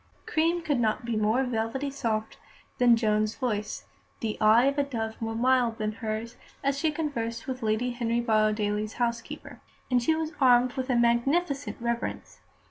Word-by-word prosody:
Cream 335 Hz, +2 st, +1 dB
could 290 Hz, -6 st, 0 dB
not 225 Hz, +1 st, 0 dB
be 235 Hz, -1 st, -1 dB
more 215 Hz, +4 st, +2 dB
velvety 250 Hz, +3 st, -2 dB
soft 220 Hz, -5 st, -2 dB, 0.4 s
than 245 Hz, -1 st, +6 dB
Joan's 215 Hz, -1 st, +1 dB
voice, 215 Hz, -5 st, -3 dB, 0.3 s
the 220 Hz, -2 st, -2 dB
eye 220 Hz, +3 st, +6 dB
of 280 Hz, +1 st, +1 dB
a -, -, +4 dB
dove 225 Hz, -5 st, -4 dB
more 225 Hz, 0 st, -2 dB
mild 245 Hz, -1 st, +2 dB
than 215 Hz, 0 st, -1 dB
hers, 220 Hz, +1 st, -5 dB, 0.3 s
as 275 Hz, 0 st, +1 dB
she 315 Hz, +3 st, +1 dB
conversed 235 Hz, -7 st, -3 dB
with 260 Hz, -1 st, -5 dB
Lady 220 Hz, +3 st, 0 dB
Henry 235 Hz, -1 st, -1 dB
Borrowdaile's 215 Hz, -2 st, +1 dB
housekeeper. 240 Hz, +4 st, -4 dB, 0.3 s
And 250 Hz, -1 st, +4 dB
she 315 Hz, +7 st, +2 dB
was 320 Hz, 0 st, -2 dB
armed 250 Hz, -1 st, +5 dB
with 260 Hz, 0 st, -4 dB
a 250 Hz, -, +2 dB
magnificent 275 Hz, +6 st, +1 dB
reference. 235 Hz, 0 st, -3 dB
235 Hz, 165 wpm, -27 LUFS, 220-265 Hz, 0.4 s, than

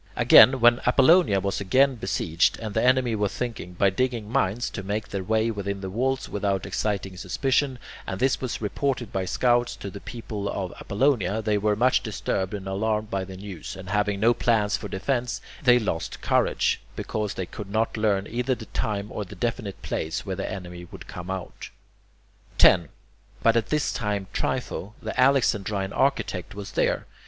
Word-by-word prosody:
Again, 130 Hz, 0 st, +7 dB
when 120 Hz, 0 st, +6 dB
Apollonia 135 Hz, -, +5 dB
was 100 Hz, +1 st, -2 dB
being 130 Hz, +8 st, +4 dB
besieged, 95 Hz, -6 st, 0 dB
and 110 Hz, -2 st, -6 dB
the 110 Hz, -, +1 dB
enemy 130 Hz, -1 st, +3 dB
were 105 Hz, -1 st, +1 dB
thinking, 115 Hz, -6 st, -5 dB
by 100 Hz, +2 st, +3 dB
digging 120 Hz, 0 st, -1 dB
mines, 120 Hz, -3 st, +1 dB
to 100 Hz, -, -5 dB
make 105 Hz, +2 st, -3 dB
their 100 Hz, -1 st, -3 dB
way 110 Hz, +3 st, +1 dB
within 100 Hz, -2 st, -4 dB
the 95 Hz, -1 st, -5 dB
walls 130 Hz, +5 st, -1 dB
without 100 Hz, -2 st, -1 dB
exciting 100 Hz, -3 st, -2 dB
suspicion, 135 Hz, +5 st, 0 dB, 0.3 s
and 95 Hz, -, -4 dB
this 130 Hz, 0 st, +1 dB
was 125 Hz, -3 st, -4 dB
reported 125 Hz, +1 st, -2 dB
by 95 Hz, -1 st, -1 dB
scouts 120 Hz, +4 st, +1 dB
to 100 Hz, -, -7 dB
the 100 Hz, -, -8 dB
people 105 Hz, -4 st, -5 dB
of 95 Hz, -3 st, -4 dB
Apollonia, 110 Hz, -2 st, +1 dB
they 105 Hz, 0 st, +1 dB
were 105 Hz, 0 st, +1 dB
much 125 Hz, +4 st, +3 dB
disturbed 95 Hz, -3 st, -2 dB
and 100 Hz, -2 st, -7 dB
alarmed 105 Hz, +2 st, -1 dB
by 95 Hz, -1 st, -1 dB
the 95 Hz, 0 st, -9 dB
news, 95 Hz, -1 st, -7 dB
and 95 Hz, -1 st, -9 dB
having 105 Hz, -1 st, +1 dB
no 115 Hz, +3 st, +4 dB
plans 110 Hz, -4 st, +1 dB
for 105 Hz, -, -5 dB
defence, 120 Hz, +6 st, -2 dB, 0.2 s
they 125 Hz, -4 st, +6 dB
lost 105 Hz, -8 st, -3 dB
courage, -, -, +1 dB
because 105 Hz, -2 st, -3 dB
they 95 Hz, -, -3 dB
could 100 Hz, +3 st, -8 dB
not 110 Hz, +2 st, 0 dB
learn 105 Hz, -3 st, +1 dB
either 125 Hz, +3 st, -1 dB
the -, -, -9 dB
time 105 Hz, -3 st, -3 dB
or 105 Hz, -, -3 dB
the 95 Hz, -, -11 dB
definite 115 Hz, -4 st, -3 dB
place 80 Hz, 0 st, -3 dB
where -, -, -3 dB
the -, -, -4 dB
enemy 90 Hz, -2 st, -7 dB
would -, -, -10 dB
come 90 Hz, 0 st, -8 dB
out. 95 Hz, -2 st, -6 dB, 0.9 s
10. 85 Hz, -5 st, +6 dB, 0.5 s
But 115 Hz, 0 st, +5 dB
at 115 Hz, -, +1 dB
this 150 Hz, -1 st, 0 dB
time 105 Hz, -3 st, -2 dB
Trypho, 105 Hz, +4 st, -3 dB
the -, -, -5 dB
Alexandrine 105 Hz, -7 st, +2 dB
architect, 100 Hz, -, 0 dB
was 100 Hz, 0 st, -7 dB
there. -, -, 0 dB
105 Hz, 180 wpm, -25 LUFS, 95-120 Hz, 0.9 s, Again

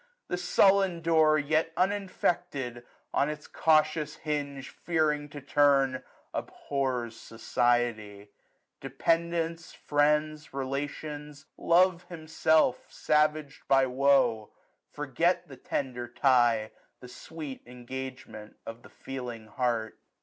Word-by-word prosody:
The 180 Hz, -, -1 dB
sullen 190 Hz, 0 st, +3 dB
door, 160 Hz, -2 st, +4 dB
Yet 155 Hz, +2 st, +1 dB
uninfected, 175 Hz, -10 st, -1 dB, 0.3 s
on 140 Hz, -, +2 dB
its 150 Hz, 0 st, -6 dB
cautious 155 Hz, -1 st, +1 dB
hinge 145 Hz, -3 st, -4 dB
Fearing 150 Hz, -3 st, -1 dB
to 145 Hz, -, -8 dB
turn, 135 Hz, -2 st, +3 dB, 0.3 s
abhors 130 Hz, -5 st, -3 dB
society: 115 Hz, -3 st, -1 dB, 0.5 s
Dependants, 165 Hz, +4 st, -1 dB
friends, 150 Hz, 0 st, 0 dB
relations. 145 Hz, +2 st, -5 dB
Love 180 Hz, 0 st, +3 dB
himself, 160 Hz, -4 st, +2 dB
1080 -, -, -28 dB, 0.6 s
Savag'd -, -, -21 dB
by 135 Hz, -1 st, +4 dB
woe, 130 Hz, -4 st, +2 dB, 0.4 s
forget 170 Hz, +5 st, 0 dB
the 135 Hz, -, -11 dB
tender 125 Hz, -2 st, -4 dB
tie, 120 Hz, -4 st, +2 dB, 0.3 s
The 125 Hz, -, -11 dB
sweet 145 Hz, +2 st, -8 dB
engagement 125 Hz, -3 st, -8 dB
of 115 Hz, +1 st, -8 dB
the -, -, -15 dB
feeling 125 Hz, -4 st, -7 dB
heart. 115 Hz, 0 st, -2 dB
140 Hz, 100 wpm, -28 LUFS, 125-160 Hz, 0.6 s, door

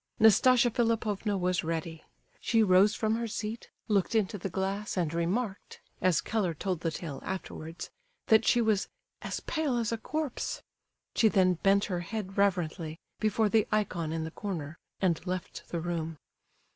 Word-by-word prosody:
Nastasia 240 Hz, +3 st, +6 dB
Philipovna 220 Hz, -3 st, 0 dB
was 180 Hz, -1 st, 0 dB
ready. 165 Hz, 0 st, -3 dB, 0.4 s
She 225 Hz, -2 st, +3 dB
rose 195 Hz, +2 st, +5 dB
from 220 Hz, -1 st, +1 dB
her 235 Hz, 0 st, -2 dB
seat, 215 Hz, +1 st, -5 dB, 0.2 s
looked 205 Hz, 0 st, +1 dB
into 205 Hz, -2 st, +1 dB
the 195 Hz, -, -3 dB
glass 195 Hz, +3 st, -2 dB
and 165 Hz, -3 st, 0 dB
remarked, 190 Hz, +5 st, -2 dB, 0.2 s
as 180 Hz, -4 st, +3 dB
Keller 195 Hz, -7 st, -1 dB
told 185 Hz, +2 st, -2 dB
the 165 Hz, -, 0 dB
tale 155 Hz, -2 st, -6 dB
afterwards, 175 Hz, -3 st, -6 dB, 0.3 s
that 220 Hz, -3 st, +5 dB
she 240 Hz, +2 st, +4 dB
was 215 Hz, -3 st, +2 dB, 0.3 s
"as -, -, -4 dB
pale 305 Hz, -6 st, -1 dB
as 235 Hz, -1 st, 0 dB
a 230 Hz, -, -2 dB
corpse." 305 Hz, +2 st, -3 dB, 0.5 s
She 225 Hz, -, +4 dB
then 190 Hz, -4 st, +4 dB
bent 200 Hz, +1 st, +4 dB
her 180 Hz, -3 st, -2 dB
head 195 Hz, +1 st, -5 dB
reverently, 175 Hz, -5 st, 0 dB, 0.2 s
before 215 Hz, 0 st, +2 dB
the 220 Hz, +2 st, +3 dB
ikon 180 Hz, -7 st, 0 dB
in 160 Hz, 0 st, -2 dB
the 160 Hz, -, -5 dB
corner, 170 Hz, -5 st, -5 dB, 0.2 s
and 175 Hz, -5 st, +1 dB
left 185 Hz, 0 st, -5 dB
the 170 Hz, -, -2 dB
room. 165 Hz, -1 st, -3 dB
195 Hz, 160 wpm, -30 LUFS, 170-220 Hz, 0.5 s, Nastasia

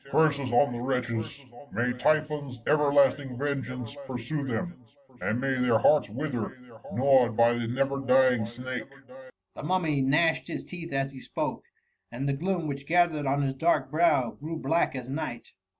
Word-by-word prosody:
Curses 140 Hz, -4 st, +2 dB
on 120 Hz, +1 st, +4 dB
the 120 Hz, -, -5 dB
wretches 125 Hz, +1 st, -3 dB
!— 145 Hz, +1 st, -16 dB
May 125 Hz, +1 st, 0 dB
Typhon's 150 Hz, 0 st, 0 dB
ever 150 Hz, -2 st, +3 dB
lasting 140 Hz, -2 st, +3 dB
vengeance 130 Hz, -3 st, -3 dB
pursue 130 Hz, +4 st, -3 dB
thena, 130 Hz, +8 st, -3 dB, 0.5 s
and 110 Hz, +3 st, -1 dB
may 135 Hz, +1 st, 0 dB
their 125 Hz, -3 st, +3 dB
hearts 115 Hz, 0 st, +4 dB
wither, 125 Hz, 0 st, -4 dB, 0.3 s
gnawed 130 Hz, -3 st, +3 dB
by 115 Hz, 0 st, +5 dB
the 120 Hz, -1 st, -2 dB
never 135 Hz, +3 st, 0 dB
dying 130 Hz, -4 st, +3 dB
snake 130 Hz, +3 st, -6 dB, 0.3 s
!*" 95 Hz, -7 st, -23 dB
The -, -, -7 dB
Mummy 160 Hz, -3 st, 0 dB
gnashed 150 Hz, +5 st, +2 dB
his -, -, -5 dB
teeth 170 Hz, -2 st, -8 dB
as 135 Hz, 0 st, -1 dB
he 130 Hz, -, -10 dB
spoke, -, -, -4 dB, 0.5 s
and 130 Hz, +4 st, -3 dB
the 140 Hz, -, +1 dB
gloom 175 Hz, +3 st, -1 dB
which 140 Hz, -1 st, -5 dB
gathered 165 Hz, -4 st, +2 dB
on 140 Hz, +1 st, +1 dB
his 135 Hz, -1 st, 0 dB
dark 140 Hz, -2 st, +1 dB
brow 150 Hz, -7 st, +3 dB
grew 160 Hz, +3 st, -6 dB
black 165 Hz, -2 st, +1 dB
as 125 Hz, -2 st, -5 dB
night. 135 Hz, -3 st, -5 dB
135 Hz, 170 wpm, -28 LUFS, 125-150 Hz, 0.5 s, by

